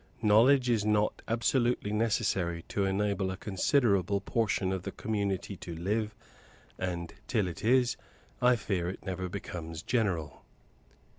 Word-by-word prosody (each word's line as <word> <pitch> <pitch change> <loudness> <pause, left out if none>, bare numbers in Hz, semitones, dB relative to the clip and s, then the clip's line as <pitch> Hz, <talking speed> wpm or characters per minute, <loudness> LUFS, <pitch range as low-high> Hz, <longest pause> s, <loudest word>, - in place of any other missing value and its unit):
Knowledge 125 +5 +5
is 115 -4 +2
not 105 0 +1
absolutely 120 -1 +1
necessary 95 -6 0
to 100 - 0
enable 100 0 0
a 95 - -4
considerable 100 - +2
portion 100 -2 0
of 95 - -2
the - - -5
community 100 -2 -2
to 85 -1 -7
live; 105 +6 -1 0.6
and, 85 -2 -3
till 105 -6 +1
it 85 -2 -7
is, 125 +1 +3 0.4
I 125 0 +5
fear 95 -5 -2
it 95 - -8
never 95 -1 -3
becomes 85 -4 -6
general. 95 -11 -1
100 Hz, 135 wpm, -30 LUFS, 95-115 Hz, 0.6 s, Knowledge